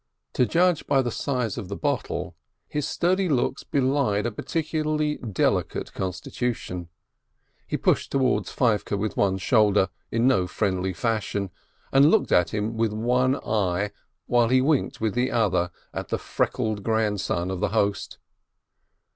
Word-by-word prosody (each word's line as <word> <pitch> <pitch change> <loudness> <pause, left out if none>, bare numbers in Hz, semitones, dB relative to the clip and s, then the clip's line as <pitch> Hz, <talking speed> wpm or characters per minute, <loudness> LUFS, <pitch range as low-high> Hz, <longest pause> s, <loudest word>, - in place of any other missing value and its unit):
To 125 - +2
judge 175 +4 +2
by 135 -2 +3
the 120 - -2
size 125 -5 -2
of 95 - -6
the 100 - -5
bottle, 105 - -2 0.3
his 150 -1 -2
sturdy 185 +1 +1
looks 135 -5 0
belied 130 -6 +1
a 120 - 0
peculiarly 155 +3 -1
delicate 105 -6 -1
constitution. 95 -1 -4 0.8
He - - -1
pushed - - +1
towards 135 -2 +1
Feivke 105 -4 +1
with 105 +2 -2
one 95 -1 +2
shoulder, 105 -2 +3 0.2
in 115 +1 +1
no 95 -9 +3
friendly 95 -1 -1
fashion, 100 -2 -2 0.4
and 140 +2 +6
looked 220 +3 +2
at 90 0 +4
him 110 +2 -2
with 110 -2 +1
one 125 +4 +2
eye, 100 -1 0 0.3
while 120 -1 +3
he 130 +1 +5
winked 140 +2 +1
with 110 -2 0
the 125 +1 +1
other 95 -6 +1 0.2
at - - -4
the - - -1
freckled 110 -2 -1
grandson 105 -4 0
of 95 - -3
the 105 +1 0
host. 100 -1 -1
110 Hz, 145 wpm, -25 LUFS, 100-130 Hz, 0.8 s, and